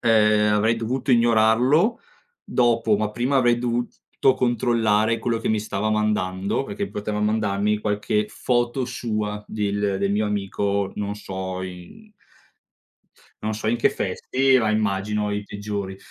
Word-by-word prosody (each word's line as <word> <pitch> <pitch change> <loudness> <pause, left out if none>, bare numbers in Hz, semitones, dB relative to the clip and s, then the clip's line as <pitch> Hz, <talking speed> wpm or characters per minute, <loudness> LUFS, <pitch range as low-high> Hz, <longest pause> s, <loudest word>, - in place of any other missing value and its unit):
ehm, 105 -2 +4
avrei 110 +2 +2
dovuto 120 +4 -2
ignorarlo, 120 - +3 0.4
dopo, 115 -3 +2
ma 105 0 -1
prima 125 +5 0
avrei 120 -2 +3
dovuto 120 0 -2 0.3
controllare 115 -2 +1
quello 115 0 -1
che 115 - -3
mi 110 -1 +1
stava 105 0 -2
mandando, 105 0 0
perché 200 +5 -4
poteva 105 0 -4
mandarmi 105 -1 +1
qualche 105 0 -1
foto 120 +2 0
sua 105 -4 -3
del 100 -2 -1
del 100 0 0
mio 105 +1 +1
amico, 100 -1 -1
non 100 0 -3
so 95 -2 -5
in 95 - -10 1.3
non 110 0 -2
so 110 +1 -5
in 120 - +2
che 115 - +3
vesti, 130 0 +1
ma 110 -2 +1
immagino 105 0 0
i 105 0 -2
peggiori. 100 -1 -5
105 Hz, 140 wpm, -23 LUFS, 105-120 Hz, 1.3 s, ehm